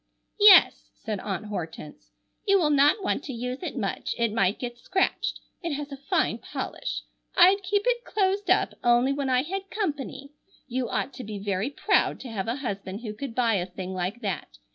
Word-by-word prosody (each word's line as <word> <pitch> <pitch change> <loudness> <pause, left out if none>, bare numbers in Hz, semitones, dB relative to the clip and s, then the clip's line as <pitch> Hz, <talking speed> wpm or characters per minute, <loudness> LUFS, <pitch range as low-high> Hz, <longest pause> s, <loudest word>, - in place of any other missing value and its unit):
"Yes," 410 -3 +7
said 215 -3 -4
Aunt 195 0 -4
Hortense, 165 -7 -7 0.4
"you 395 0 +6
will 310 -5 +2
not 290 +8 +4
want 290 - 0
to 270 - -5
use 250 +2 -4
it 355 - -5
much, - - -2
it 235 -3 +1
might 200 -3 +2
get 240 -1 -6
scratched. 380 - 0 0.2
It 335 -4 -2
has 290 0 -5
a 275 - -6
fine - - +1
polish. - - -5 0.3
I'd 375 +3 +7
keep 400 +2 0
it 485 -1 +1
closed 395 -1 0
up 370 - +3
only 240 +3 +4
when 280 -1 -2
I 255 0 +3
had 390 +4 -5
company. 290 - -4 0.4
You 250 -1 -2
ought - - -2
to 255 - -8
be 210 -2 -6
very 200 +3 -1
proud 285 - +1
to 255 - -7
have 195 -3 -3
a 230 - 0
husband 200 -1 -4
who 215 -3 -5
could 235 +1 -6
buy 235 -3 +2
a 180 0 -2
thing 185 0 -6
like 185 +6 -3
that. 165 - -4
255 Hz, 195 wpm, -26 LUFS, 210-355 Hz, 0.4 s, Yes